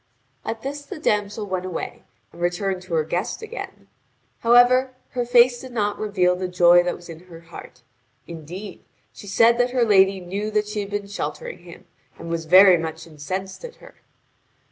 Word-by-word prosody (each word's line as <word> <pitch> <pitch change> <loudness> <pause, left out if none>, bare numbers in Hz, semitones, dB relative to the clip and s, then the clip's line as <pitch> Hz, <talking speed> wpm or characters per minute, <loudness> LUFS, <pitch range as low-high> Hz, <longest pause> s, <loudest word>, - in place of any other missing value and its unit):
At 225 0 -5
this 285 +2 -5
the 285 - -9
damsel 210 -5 -1
went 185 -2 -3
away, 185 -2 -6 0.3
and 170 - -13
returned 180 +2 -1
to 185 -2 -5
her 160 - +2
guest 175 - -3
again. 445 +3 -8 0.5
However, 250 +2 +4 0.2
her 245 -1 -2
face 245 0 +4
did 260 -2 -10
not 205 -3 -1
reveal 185 -4 +1
the 185 0 -3
joy 175 -1 +5
that 175 0 -2
was 175 - -14
in 165 -1 -10
her 165 -2 -13
heart; 170 +1 -13 0.4
indeed, 170 +5 -9 0.3
she 205 - -12
said 230 +4 +4
that 245 0 +3
her 245 -1 +1
lady 195 -2 +4
knew 195 +4 -4
that 210 -1 0
she 210 0 -4
had 200 -1 -4
been 205 0 -3
sheltering 485 - -6
him, - - -14 0.3
and 165 - -9
was 165 -1 -3
very 185 +1 +7
much 160 -1 -6
incensed 185 - -6
at 485 -1 -9
her. - - -16
200 Hz, 185 wpm, -22 LUFS, 175-235 Hz, 0.5 s, very